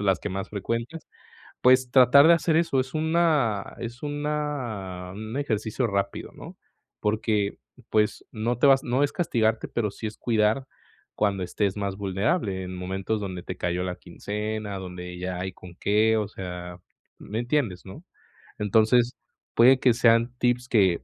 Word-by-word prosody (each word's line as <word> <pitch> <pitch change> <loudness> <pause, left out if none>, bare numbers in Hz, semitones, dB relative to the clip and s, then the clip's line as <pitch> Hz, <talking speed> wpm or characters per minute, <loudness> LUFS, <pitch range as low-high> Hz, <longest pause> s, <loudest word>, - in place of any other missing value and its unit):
de - - -3
las 95 -3 +3
que - - -3
más 95 +1 -4
frecuentas. 115 +10 -4 0.6
Pues, 130 0 +5
tratar 130 +3 +7
de 170 - +8
hacer 165 -1 +2
eso 165 -5 +2
es 130 +1 -3
una 155 - +1
es 120 +2 -7
una 145 -12 -3
un 110 +3 -6
ejercicio 115 -2 -1
rápido, 100 -1 -2
¿no? - - -10 0.4
Porque, 105 -1 0 0.3
pues, 105 -1 +1
no 115 +2 -1
te 140 - +5
vas 135 -1 +5
no 130 +4 +1
es 145 - +1
castigarte, 115 -9 0
pero 110 -3 -1
sí 100 - -8
es 105 - -8
cuidar 115 +3 +1 0.5
cuando 100 -2 0
estés 95 +2 -1
más 100 -1 -2
vulnerable, 100 - -1
en 90 0 -6
momentos 95 +4 -3
donde 95 -3 -5
te 90 0 -6
cayó 90 +1 -1
la 90 -1 -3
quincena, 105 +2 -5
donde 90 -1 -7
ya 90 0 -4
hay 95 +1 -4
con 90 -1 -13
qué. 110 +3 +2
O 105 -2 -1
sea, 90 -3 -7 0.4
¿me 110 +2 -5
entiendes, 120 -7 -1
no? 95 - -10 0.5
Entonces, 110 +4 +3 0.4
puede 130 +3 +6
que 125 -2 +4
sean 115 +1 +3
tips 125 0 +1
que, 95 -8 +3
110 Hz, 165 wpm, -26 LUFS, 95-125 Hz, 0.6 s, de